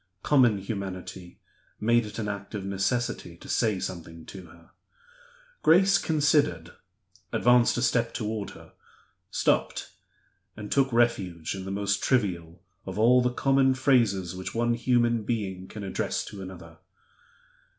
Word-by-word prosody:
Common 125 -7 +4
humanity 95 -3 -6 0.4
made 115 +1 +2
it 105 - -9
an 110 -2 -3
act 100 +1 -6
of 100 -2 -4
necessity 100 -2 -2
to - - -13
say 110 -5 +1
something 85 -3 -7
to 95 -3 -10
her. 85 +1 -19 0.9
Grace 195 +4 +5
considered 145 - +1 0.6
advanced 120 0 +4
a 120 - 0
step 115 -1 +1
toward 105 -1 -4
her - - -16 0.6
stopped - - 0 0.7
and 105 -1 -8
took 135 -1 +2
refuge 95 -9 0
in 95 -1 -6
the - - -5
most 100 0 -1
trivial 90 -8 -1 0.2
of 95 +1 -7
all 120 +3 +5
the 125 - +2
common 135 +1 +2
phrases 110 -10 +2
which 95 +3 -6
one 120 +1 +1
human 120 -1 +2
being 100 -5 -3
can 105 - -8
address 100 - -2
to 100 - -9
another. 85 -3 -10
105 Hz, 140 wpm, -27 LUFS, 95-120 Hz, 0.9 s, Grace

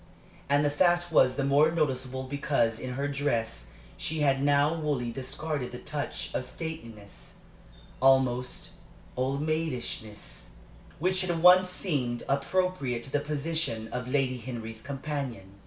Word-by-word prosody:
And 145 +1 +4
the 145 - +2
fact 175 +2 +2
was 130 -5 +5
the 140 - 0
more 140 +3 +5
noticeable 130 -5 -1
because 130 -4 0
in 125 -1 -4
her 140 +2 -1
dress 120 - -1 0.3
she 155 0 -2
had 135 -2 +3
now 145 +2 +4
wholly 145 -7 -1
discarded 135 +2 -3
the 125 - -6
touch 145 +2 -4
of - - -1
stateliness 115 - -8 0.7
almost 130 -2 +2 0.4
old 135 +3 -1
maidishness 120 - -3 0.5
which 185 +3 +1
had 175 -3 -1
once 180 +1 +8
seemed 140 -11 -1
appropriate 140 -3 0
to 135 - -9
the 145 - +2
position 150 -6 -2
of 125 0 -4
Lady 130 -2 0
Henry's 115 -2 -6
companion. 135 -8 -5
140 Hz, 135 wpm, -29 LUFS, 125-155 Hz, 0.7 s, once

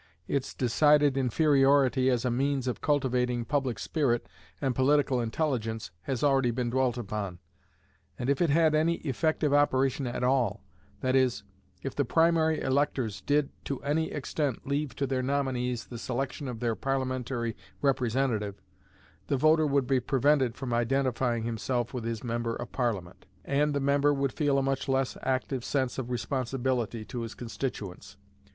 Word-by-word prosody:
Its 140 -2 -2
decided 145 +3 +4
inferiority 135 -1 +3
as 125 -1 +1
a 125 - +1
means 135 +1 0
of 125 - -2
cultivating 125 -4 +1
public 130 -2 -1
spirit 130 -7 0 0.3
and 135 -3 0
political 135 -1 +2
intelligence 115 - -2
has 130 - -3
already 135 -3 +3
been 120 0 -1
dwelt 130 -1 +1
upon; 105 -5 -4 0.8
and 120 - -3
if 140 +2 +1
it 170 - +3
had 160 +1 +4
any 160 +2 +3
effective 150 +1 +1
operation 135 -2 +2
at 120 0 -3
all 125 -4 +1 0.4
that 130 0 +1
is, 130 -2 +2 0.4
if - - -3
the - - +1
primary 160 -1 +3
electors 130 -5 0
did 145 -1 +1
to 140 - -3
any 155 +3 0
extent 145 -2 -2
leave 140 0 -1
to 140 - -1
their 130 -1 -1
nominees 130 -3 -1
the 120 - -8
selection 130 +4 -3
of 120 -2 -6
their 120 -2 +1
Parliamentary 130 -3 -2 0.3
representative, 125 -6 +1 0.7
the 140 - +1
voter 155 +2 +4
would 140 -2 +2
be 135 0 +2
prevented 130 0 +2
from 130 -3 -4
identifying 120 -1 +1
himself 120 +2 -2
with 120 -3 -4
his 115 -1 -3
member 115 -1 -2
of 120 - -6
Parliament, 110 -9 -3 0.2
and 145 +1 +1
the - - +1
member 140 +1 +3
would 140 -2 0
feel 145 -3 +1
a 135 - +2
much 135 0 -1
less 135 -1 +1
active 130 -1 -1
sense 130 -1 -1
of 125 -2 -4
responsibility 125 -2 -2
to 120 - -5
his 115 0 -6
constituents. 115 -5 -6
130 Hz, 160 wpm, -29 LUFS, 120-140 Hz, 0.8 s, decided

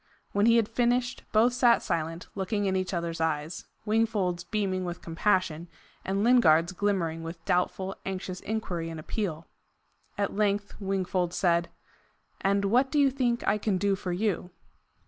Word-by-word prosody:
When 205 +2 +3
he 230 - +6
had 230 -3 +3
finished, 245 +2 0
both 230 +3 +4
sat 245 -1 +4
silent, 165 +1 -2
looking 205 +1 -1
in 190 -1 +1
each 185 0 -1
other's 170 -2 -3
eyes, 155 +1 -2 0.2
Wingfold's 210 -5 +1
beaming 185 0 -1
with 175 -1 -5
compassion, 170 -1 0 0.4
and 195 +1 -1
Lingard's 175 -9 +5
glimmering 185 -4 -1
with 165 0 -8
doubtful, 190 +2 0
anxious 185 -1 -4
inquiry 185 -6 -3
and 165 -1 -6
appeal. 165 -1 -3 0.7
At 200 0 -1
length 205 -1 0
Wingfold 185 -3 -1
said: 170 -2 +2 0.7
"And 200 +1 +2
what 250 +7 +3
do 300 - 0
you 280 -2 +5
think 245 -3 0
I 210 +1 +3
can 205 -3 0
do 200 +1 +1
for 190 -1 -4
you?" 185 -1 -1
195 Hz, 155 wpm, -28 LUFS, 175-215 Hz, 0.7 s, he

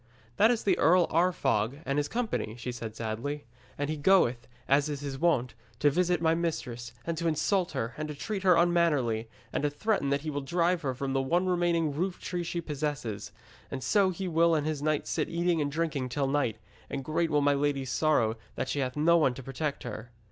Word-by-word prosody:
'That 220 - +6
is 235 -2 +1
the 200 - +2
Earl 175 +3 +5
Arfog 145 - +1
and 140 +1 0
his 145 - 0
company,' 225 - -2
she 125 +1 -4
said 115 -2 -6
sadly. 115 +6 -4 0.3
'And 145 - -1
he 155 +1 -2
goeth, 140 -8 +3 0.2
as 140 +2 +3
is 145 -1 -4
his 140 -2 -5
wont, 130 -8 +2 0.2
to 145 +3 +3
visit 175 +1 +1
my 160 0 +4
mistress, 120 -8 -3
and 170 - -1
to 170 - 0
insult 180 +4 +1
her, 115 +2 -2
and 155 0 -3
to 150 - -6
treat 200 +6 -4
her 185 -2 +5
unmannerly, 150 -10 +2 0.2
and - - 0
to 145 - +1
threaten 145 0 0
that 140 0 +1
he 155 0 -4
will 145 0 -2
drive 170 +4 +1
her 130 -3 -2
from 135 +1 -3
the 135 - +2
one 170 +7 +1
remaining 175 -4 +1
roof 180 +5 -2
tree 180 -1 -3
she 170 0 -3
possesses. 140 -10 -4 0.4
And 130 -2 -5
so 195 - +3
will 170 -2 +3
he - - +4
and 150 - -1
his 155 -2 -2
knights 155 0 0
sit 155 - -1
eating 170 -1 +1
and 145 -1 -1
drinking 150 -4 -1
till 140 +3 0
night, 135 -5 0 0.3
and 135 -1 -4
great 165 +3 0
will 150 -1 +2
be - - +1
my 145 - +5
lady's 140 -2 0
sorrow 115 -8 +2 0.2
that - - -3
she 145 - -1
hath 130 0 -2
no 170 +3 +5
one 135 -6 +2
to 135 - -8
protect 140 +3 -3
her.' 120 0 -7
150 Hz, 220 wpm, -29 LUFS, 135-170 Hz, 0.4 s, That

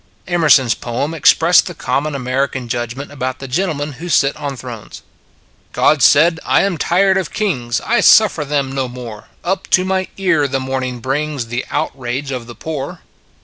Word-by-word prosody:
Emerson 160 -7 +4
s 115 - +2
poem 125 +6 -3
expressed 160 - +4
the - - -7
common 140 +4 -2
American 130 0 -2
judgment 120 +4 -4
about 130 -2 -4
the 135 - -8
gentlemen 150 0 -2
who 175 - -5
sit 140 -3 +2
on 140 -2 -5
thrones: 120 -4 -9 0.7
God 150 -2 +3
said 160 +6 +5
" - - -16
I - - +3
am 190 -5 -1
tired 190 +2 +2
of 190 -4 -2
Kings, 125 - -1
I 240 +3 +1
suffer 210 -8 +5
them 140 -2 -1
no 135 -1 -2
more. 120 -4 -9 0.2
Up 190 +2 -2
to 185 - +3
my 190 0 -1
ear 180 -7 +2
the 135 0 -2
morning 130 -2 -3
brings 135 -1 -2
The 120 +2 -3
outrage 135 +2 -3
of 125 -3 -5
the 120 - -10
poor." 150 -4 -6
140 Hz, 180 wpm, -17 LUFS, 125-160 Hz, 0.7 s, said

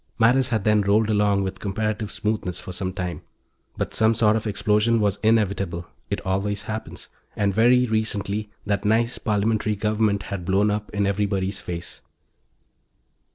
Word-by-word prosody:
Matters 125 +3 +4
had 110 -5 0
then 105 0 +3
rolled 105 +2 +2
along 105 -1 +2
with 95 - -4
comparative 110 +1 -2
smoothness 105 -4 -2
for - - -7
some 90 +1 -3
time. 90 -1 -4 0.6
But - - -3
some 110 +1 +3
sort 110 -1 +3
of 110 0 -2
explosion 105 +2 +2
was 100 -2 +1
inevitable 100 -6 +1 0.2
it - - -1
always 100 +2 -1
happens 110 0 -6 0.3
and, 100 -1 +1
very 125 +4 +5
recently, 105 -2 -2 0.2
that 100 -2 0
nice 115 +3 +1
Parliamentary 105 0 0
government 105 -1 0
had 100 -3 -5
blown 100 +3 +2
up 105 0 -3
in 105 -1 -1
everybody's 100 -1 -1
face. 85 0 -7
105 Hz, 155 wpm, -24 LUFS, 100-110 Hz, 0.6 s, very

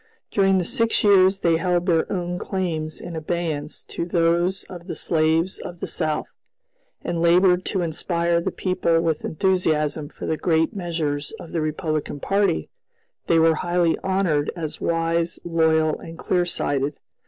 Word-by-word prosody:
During 195 -1 +3
the 180 - +1
six 230 +5 +1
years 195 -1 +5
they 165 -1 +3
held 175 0 0
their 165 -3 +1
own 180 -2 -2
claims 160 -5 -3
in 175 -1 -7
abeyance 160 -2 -3
to - - -5
those 175 +2 +1
of 180 -1 -11
the - - -4
slaves 160 +2 +1
of 175 -1 -8
the - - -3
South, 155 -1 -2 0.8
and 170 -1 -2
labored 180 +2 +4
to 190 -3 -1
inspire 170 +1 0
the - - -1
people 180 -3 +1
with 165 -2 0
enthusiasm 155 -4 0
for - - -8
the 160 - -1
great 160 +1 +1
measures 160 -5 -2
of 165 - -10
the 165 - -1
Republican 155 -1 -2
party, 195 +1 +1 0.6
they 165 - +4
were 165 0 +5
highly 175 0 +1
honored 185 -6 +1
as 160 -3 -5
"wise, 165 0 0
loyal, 160 -2 +2
and 165 0 -10
clear 175 +1 0
sighted." 140 -3 -1
170 Hz, 155 wpm, -23 LUFS, 160-180 Hz, 0.8 s, years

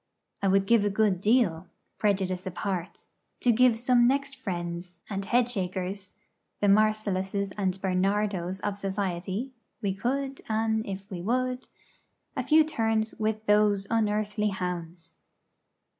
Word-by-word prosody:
I 200 - +1
would 195 0 +3
give 230 0 +4
a 205 - +2
good 195 -3 +1
deal 195 -7 +2 0.3
prejudice 190 -3 0
apart 185 -1 -4 0.4
to 245 - +4
give 240 0 +4
some 240 +1 +3
next 275 +3 +1
friends 175 -6 -5
and 195 -1 -2
Head 240 +4 +2
shakers 190 -3 -4 0.5
(the - - +1
Marcelluses 200 -2 +2
and 195 -2 -1
Bernardos 190 -1 0
of 205 -1 -2
society 195 +4 -2 0.3
'We 200 -4 -1
could, 270 +6 -2
an 220 0 +1
if 195 0 -7
we 180 -2 -4
would 255 +5 -1 0.3
') - - -47
a - - 0
few 315 0 +5
turns 225 -7 0
with 215 0 -1
those 210 -1 +3
unearthly 210 -1 +1
hounds. 175 -3 -5
205 Hz, 135 wpm, -28 LUFS, 185-225 Hz, 0.5 s, few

